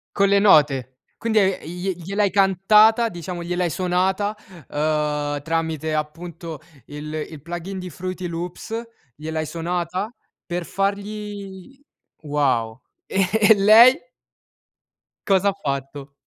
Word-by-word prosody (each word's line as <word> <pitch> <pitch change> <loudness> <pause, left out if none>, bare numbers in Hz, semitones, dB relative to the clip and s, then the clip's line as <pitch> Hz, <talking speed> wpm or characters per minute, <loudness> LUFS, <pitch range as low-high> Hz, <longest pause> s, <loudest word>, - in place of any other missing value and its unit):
Con 200 0 +3
le 200 0 +4
note. 145 -9 +4 0.2
Quindi 225 -1 +1
hai 195 -2 +1
i 180 - -7
glie 190 +1 -1
gliel'hai 195 +4 -1
cantata 210 +4 +4
diciamo, 175 0 -6
gliel'hai 175 0 -1
suonata, 190 +4 0 0.4
uhm, 150 -1 -1
tramite 160 -1 -2
appunto 165 +1 -5 0.3
il 150 +1 -8 0.2
il 155 -4 -11
plugin 175 +4 -6
di 180 -1 -6
Fruity 185 +2 -5
Loops, 175 +7 -5 0.3
gliel'hai 155 +1 -3
suonata 175 +5 -3 0.4
per 175 0 -3
fargli 200 +3 -4 0.4
wow. 130 -6 0 0.3
E 190 -1 +1
e 220 0 +6
lei? 225 +7 +7 1.3
Cos'ha 195 0 +3
fatto? 140 -5 -5
180 Hz, 115 wpm, -22 LUFS, 155-200 Hz, 1.3 s, lei